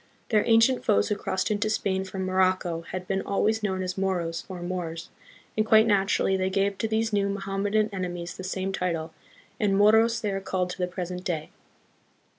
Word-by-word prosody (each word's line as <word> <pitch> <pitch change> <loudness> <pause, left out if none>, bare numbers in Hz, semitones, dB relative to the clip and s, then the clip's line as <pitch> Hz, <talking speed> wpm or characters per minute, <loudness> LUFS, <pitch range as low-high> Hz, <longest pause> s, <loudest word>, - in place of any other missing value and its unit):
Their 215 -2 +3
ancient 230 +2 +4
foes 215 - +2
who 210 - +1
crossed 190 0 -2
into 210 +1 0
Spain 190 -3 0
from 190 0 -4
Morocco 185 -2 +1
had 185 0 -5
been 195 0 0
always 220 +2 0
known 190 -3 -1
as 185 +1 -4
"Moros" 175 -4 -1
or 180 -2 -6
"Moors," 170 -2 -4 0.4
and 215 - +2
quite 220 0 +5
naturally 195 -2 +2
they 190 0 0
gave 195 0 0
to 225 - 0
these 220 0 0
new 200 -1 +2
Mohammedan 200 +2 0
enemies 175 -2 -4
the 185 - -8
same 190 +1 -2
title, 165 -4 -2 0.5
and 200 -2 +2
Moros 220 +3 +5
they 210 -3 -2
are 195 0 -2
called 185 -2 -1
to 180 - -8
the 180 - 0
present 180 0 -5
day. 160 -4 -3
190 Hz, 190 wpm, -26 LUFS, 180-210 Hz, 0.5 s, quite